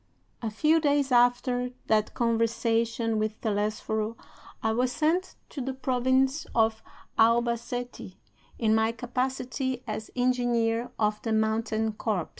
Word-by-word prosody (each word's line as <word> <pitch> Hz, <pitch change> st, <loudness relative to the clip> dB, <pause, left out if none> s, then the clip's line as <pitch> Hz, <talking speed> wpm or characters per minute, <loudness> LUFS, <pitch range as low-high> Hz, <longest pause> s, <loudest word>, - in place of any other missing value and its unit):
VI. 230 Hz, -, -2 dB
"A -, -, 0 dB
few 305 Hz, +9 st, +3 dB
days 285 Hz, -2 st, +2 dB
after 245 Hz, 0 st, +3 dB, 0.2 s
that 215 Hz, -1 st, +1 dB
conversation 230 Hz, 0 st, +1 dB
with 215 Hz, 0 st, -2 dB
Telesforo 215 Hz, +1 st, -1 dB, 0.5 s
I 220 Hz, -, +2 dB
was 245 Hz, +3 st, +1 dB
sent 325 Hz, +7 st, 0 dB
to 280 Hz, -, -6 dB
the 260 Hz, +1 st, -3 dB
province 260 Hz, +2 st, +1 dB
of 220 Hz, -1 st, +2 dB, 0.4 s
Albacete 235 Hz, -2 st, +1 dB, 0.4 s
in 220 Hz, -2 st, +2 dB
my 220 Hz, +1 st, +2 dB
capacity 255 Hz, +1 st, -2 dB
as 215 Hz, -1 st, -5 dB
engineer 245 Hz, -2 st, +1 dB
of 210 Hz, -1 st, 0 dB
the 225 Hz, -, -1 dB
mountain 220 Hz, 0 st, 0 dB
corps. 210 Hz, -5 st, -2 dB
235 Hz, 125 wpm, -27 LUFS, 220-250 Hz, 0.5 s, few